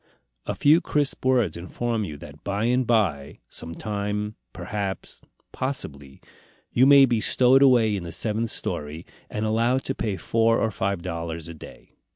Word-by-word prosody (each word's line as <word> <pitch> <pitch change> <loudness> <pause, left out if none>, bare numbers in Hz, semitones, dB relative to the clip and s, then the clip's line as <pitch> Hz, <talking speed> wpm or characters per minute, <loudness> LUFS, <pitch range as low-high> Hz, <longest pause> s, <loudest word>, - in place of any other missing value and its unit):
A - - -2
few 155 +4 +4
crisp 145 -2 -1
words 120 -10 +2
inform 110 +5 -3
you 75 -5 -7
that 70 0 -13
by 100 +1 -2
and 125 +1 +1
by, 90 -12 0
some 85 0 -7
time, 105 +1 -3 0.2
perhaps, 100 -2 -5 0.3
possibly, 70 - -5 0.5
you 130 +2 +4
may 140 -1 +8
be 120 -4 0
stowed 130 +4 +4
away 120 -6 +5
in 100 - -3
the 85 -1 -7
seventh 110 +4 -1
story, 75 -1 -4 0.2
and 105 +1 -3
allowed 115 +4 +1
to - - -2
pay 105 -4 -3
four 115 +2 +2
or 110 - 0
five 95 -3 -2
dollars 85 -2 -5
a 85 - -8
day. 80 - -14
105 Hz, 165 wpm, -24 LUFS, 85-120 Hz, 0.5 s, may